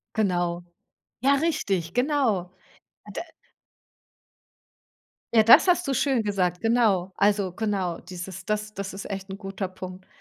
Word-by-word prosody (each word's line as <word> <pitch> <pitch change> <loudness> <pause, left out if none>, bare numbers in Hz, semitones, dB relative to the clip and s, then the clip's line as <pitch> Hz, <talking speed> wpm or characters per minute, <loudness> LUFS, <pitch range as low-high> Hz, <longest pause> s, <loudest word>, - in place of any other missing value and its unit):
Genau. 175 -4 0 0.6
Ja 275 +2 +4
richtig, 200 - -1
genau. 245 - +1 0.6
Da - - -3 2.1
Ja 220 -1 +6
das 230 - +8
hast 355 -1 +3
du 270 - +1
schön 265 -5 +1
gesagt, 180 -4 0
genau. 220 -6 +2
Also, 200 -2 +2
genau, 190 -4 -2
dieses 180 0 -8
das 210 0 -2
das 200 -2 -5
ist 200 +2 -7
echt 195 0 -5
'n 190 - -6
guter 195 -1 -4
Punkt. 185 0 -9
200 Hz, 130 wpm, -25 LUFS, 185-225 Hz, 2.1 s, das